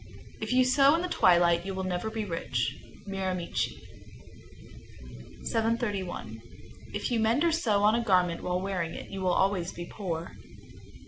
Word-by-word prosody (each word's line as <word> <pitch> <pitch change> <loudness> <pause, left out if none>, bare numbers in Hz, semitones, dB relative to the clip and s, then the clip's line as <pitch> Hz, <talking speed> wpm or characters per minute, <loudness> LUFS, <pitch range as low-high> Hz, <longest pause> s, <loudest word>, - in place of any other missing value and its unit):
_ - - -16
730. - - -14
If - - -3
you 255 0 +5
sew 275 +3 +5
in 335 - -1
the - - -1
twilight, 175 - +4
you 195 0 -4
will 190 - -3
never 185 +3 -2
be 220 -1 -3
rich. 130 - -2 0.3
Miramichi, 190 -3 -3 1.2
N.B. - - -14
731. 205 - -2 0.5
If 205 - -3
you 235 - +2
mend 225 +7 +2
or 340 - +3
sew 220 -11 +1
on 210 +1 +5
a 235 +1 +1
garment 180 -5 +2
while 180 0 -1
wearing 185 -3 -3
it, - - -8
you 195 -1 -5
will 185 -1 +2
always 185 -1 +1
be 175 - -7
poor. 170 -4 -5
195 Hz, 175 wpm, -29 LUFS, 175-225 Hz, 1.2 s, you